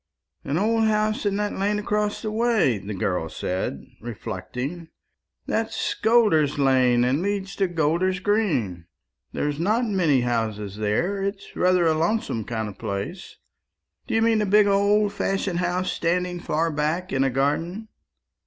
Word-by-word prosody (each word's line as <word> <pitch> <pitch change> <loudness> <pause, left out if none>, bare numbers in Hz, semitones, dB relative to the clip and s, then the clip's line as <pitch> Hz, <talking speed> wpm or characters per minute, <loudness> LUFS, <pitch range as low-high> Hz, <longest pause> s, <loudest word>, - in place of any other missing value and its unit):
"An 140 +3 -1
old 225 +3 +2
house 215 0 +1
in 200 - 0
that 210 0 -1
lane 205 +2 0
across 210 +1 -1
the 215 - -2
way?" 220 - +2
the 100 +1 -6
girl 90 -3 -1
said, 90 -7 -3 0.2
reflecting. 125 - -5 0.6
"That's - - -1
Golder's 215 - +3
lane, 130 -3 +3
and 130 +5 +1
leads 195 0 -2
to 195 - +2
Golder's 175 +3 0
green. 140 - 0 0.4
There's 145 0 -2
not 215 +8 +1
many 175 - +2
houses 110 -4 -2
there; 140 - 0
it's 200 0 -4
rather 180 -1 +3
a 160 - +4
lonesome 160 - -1
kind 110 -2 -3
of 100 - -10
place. 100 - -5 0.7
Do - - -1
you 225 - +3
mean 225 -1 +3
a 210 - 0
big 210 +1 +5
old 200 +1 +3
fashioned 195 -3 -1
house 180 +1 0
standing 180 +1 -1
far 165 0 0
back 155 +5 -1
in 135 0 +2
a 135 - +2
garden?" 165 - -1
175 Hz, 155 wpm, -24 LUFS, 130-205 Hz, 0.7 s, big